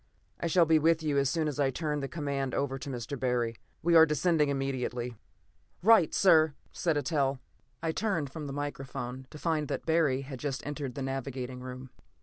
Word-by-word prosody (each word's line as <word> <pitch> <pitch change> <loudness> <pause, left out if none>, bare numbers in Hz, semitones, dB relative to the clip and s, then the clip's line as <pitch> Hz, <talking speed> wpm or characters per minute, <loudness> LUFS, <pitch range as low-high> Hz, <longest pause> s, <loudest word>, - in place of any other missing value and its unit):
I 170 - -1
shall 170 +1 +4
be 160 0 +4
with 160 +1 +3
you 145 -2 +2
as 135 -1 +2
soon 160 +2 0
as 150 -1 -3
I 140 -2 +3
turn 150 +2 -2
the 135 - -3
command 140 -4 -2
over 135 -1 -1
to 140 - -6
Mr. 125 +1 -5
Barry. 120 -3 0 0.3
We 170 +1 +3
are 160 0 +9
descending 150 -1 +2
immediately." 125 -3 -2 0.7
"Right, 220 -5 +6
sir!" 160 -6 +5 0.2
said 165 -4 0
Eitel. 140 -2 +1 0.5
I 165 - +1
turned 165 -8 -1
from 150 0 -6
the - - -5
microphone 135 -2 -5
to - - -10
find 155 -2 0
that - - -4
Barry 160 -5 +2
had 135 -1 -8
just 135 -2 -3
entered 145 -3 -4
the 140 - -3
navigating 130 -1 -4
room. 130 0 -8
140 Hz, 190 wpm, -30 LUFS, 130-160 Hz, 0.7 s, are